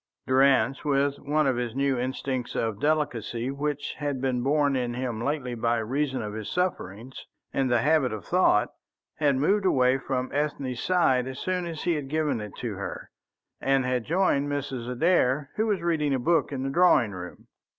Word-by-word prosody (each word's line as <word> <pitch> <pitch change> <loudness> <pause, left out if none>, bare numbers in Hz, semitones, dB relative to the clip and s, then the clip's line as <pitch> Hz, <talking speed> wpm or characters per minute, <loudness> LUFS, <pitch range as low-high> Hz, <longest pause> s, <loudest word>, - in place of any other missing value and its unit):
Durrance, 135 +1 +3
with 140 -1 +1
one 150 +2 +1
of 130 -3 +1
the 120 -1 -2
new 140 0 +1
instincts 130 0 -3
of 110 -3 -1
delicacy 130 -5 -1
which 145 +1 -3
had 145 -3 -2
been 125 -1 0
born 145 +1 +2
in 120 -2 -1
him 120 -3 -3
lately 140 -3 -2
by 115 0 0
reason 130 +3 -1
of 105 -1 -5
his 110 -1 -5
sufferings 130 - -3 0.3
and 135 -1 +1
the 120 -2 +3
habit 150 -3 +3
of 110 -2 -6
thought, 175 - +3 0.5
had 145 -3 +2
moved 195 +10 +2
away 130 -7 +3
from 130 -1 -3
Ethne's 140 -4 -2
side 135 -9 +2
as 130 0 -6
soon 180 -1 -2
as 160 -2 -6
he 175 - +2
had 145 -3 -3
given 150 -5 0
it 105 -1 -8
to 120 -4 -4
her, 100 -2 -6 0.5
and 135 -1 +2
had 125 -2 0
joined 155 - +1
Mrs. 135 -4 -3
Adair, 140 0 +2
who 220 +1 +1
was 200 -5 0
reading 150 -5 +1
a - - +1
book 165 +6 +1
in 135 -2 -3
the 135 - -2
drawing 155 - +4
room. 90 -2 -9
135 Hz, 185 wpm, -26 LUFS, 125-150 Hz, 0.5 s, drawing